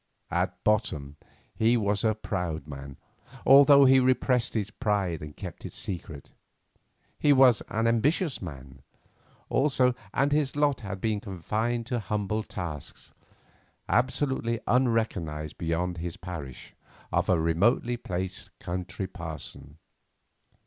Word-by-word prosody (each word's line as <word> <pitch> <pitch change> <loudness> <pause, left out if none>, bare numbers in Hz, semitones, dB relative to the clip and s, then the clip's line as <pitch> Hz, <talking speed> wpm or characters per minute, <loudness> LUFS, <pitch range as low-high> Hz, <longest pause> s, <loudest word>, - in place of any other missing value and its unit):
At 90 0 -1
bottom 75 -10 0 0.4
he 115 +2 +3
was 100 -2 0
a 110 -1 +2
proud 90 -8 -3
man, 70 -1 -8 0.5
although 140 +1 +8
he 130 0 +7
repressed 125 -1 +2
his 105 -2 -1
pride 100 -8 -1
and 75 -1 -9
kept - - -8
it - - -7
secret. 80 -6 -6 0.9
He 145 - +4
was 130 -4 +6
an 110 0 0
ambitious 135 - +1
man, 65 -6 -9 0.7
also, 130 -2 +2 0.2
and 140 +5 +1
his 145 -2 +1
lot 145 -2 +2
had 100 -3 -6
been 110 -2 0
confined 110 +5 -2
to 125 0 -2
humble 105 0 -2
tasks, 85 -9 -7 0.8
absolutely 130 -2 0
unrecognised 110 - 0
beyond 85 +2 -1
his 85 +3 -5
parish, 85 -9 -8 0.4
of - - +1
a 90 -3 +4
remotely 100 +10 +2
placed 95 -5 -5
country 90 +2 -4
parson. 80 -4 -8
105 Hz, 120 wpm, -28 LUFS, 85-120 Hz, 0.9 s, although